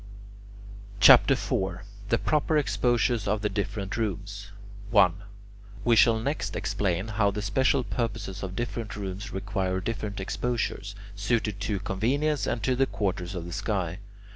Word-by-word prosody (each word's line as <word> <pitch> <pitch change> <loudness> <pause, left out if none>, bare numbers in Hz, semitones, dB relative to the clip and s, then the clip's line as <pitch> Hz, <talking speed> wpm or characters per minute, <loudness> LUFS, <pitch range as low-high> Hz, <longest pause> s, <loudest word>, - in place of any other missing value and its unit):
CHAPTER - - +8
IV 95 0 -2 0.2
THE 115 - +3
PROPER 155 +3 +1
EXPOSURES 120 -6 +1
OF 105 +1 0
THE 105 - +1
DIFFERENT 100 -1 -3
ROOMS 100 -2 -4 0.4
1. 100 -6 +5 0.7
We 120 -1 +5
shall 115 0 +6
next 110 -5 -2
explain 95 0 -1
how 100 -1 +2
the 105 +1 -4
special 130 +6 +2
purposes 110 -6 -3
of 95 -1 -5
different 115 -1 -4
rooms 100 -1 -5
require 95 -1 -2
different 105 0 -4
exposures, 100 -1 -2 0.2
suited 105 0 -1
to 100 -2 -1
convenience 140 +12 0
and 115 -3 -2
to 130 +4 +2
the 135 +1 +2
quarters 95 -3 -2
of 85 -2 -4
the 85 - -7
sky. 100 -4 -2
105 Hz, 140 wpm, -27 LUFS, 95-115 Hz, 0.7 s, CHAPTER